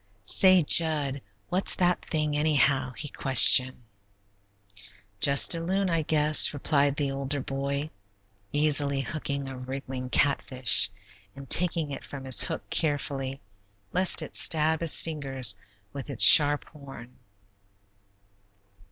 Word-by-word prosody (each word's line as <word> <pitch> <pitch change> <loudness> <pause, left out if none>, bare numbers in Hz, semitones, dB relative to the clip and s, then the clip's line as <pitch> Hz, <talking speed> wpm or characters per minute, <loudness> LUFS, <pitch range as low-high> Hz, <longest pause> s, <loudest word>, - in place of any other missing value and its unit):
"Say, 185 - +3
Jud, 145 -3 +2 0.3
what's 185 +2 -3
that 180 -1 -2
thing, 150 -2 -4
anyhow?" 145 -4 -1
he 150 - -7
questioned. 130 -1 +3 1.4
"Just 140 +7 +3
a 165 - -6
loon, 190 +2 -4
I 165 -1 -1
guess," 150 -1 +3
replied 140 0 -2
the 145 -2 -4
older 135 +1 -3
boy, 140 +2 -6 0.6
easily, 145 -2 0
hooking 140 -1 -6
a 135 - -10
wriggling 130 0 -9
catfish, 130 -4 +1 0.5
and 140 0 -13
taking 165 -1 0
it 135 - -9
from 140 -2 -11
his 130 -2 +6
hook - - -4
carefully, 140 -3 -4 0.5
lest 185 +1 +4
it - - -11
stab 160 0 +2
his 165 -2 +5
fingers 135 -9 -2 0.4
with 140 0 -10
its 135 - 0
sharp 145 -1 +5
horn. 135 -4 -15
145 Hz, 120 wpm, -24 LUFS, 135-155 Hz, 1.4 s, his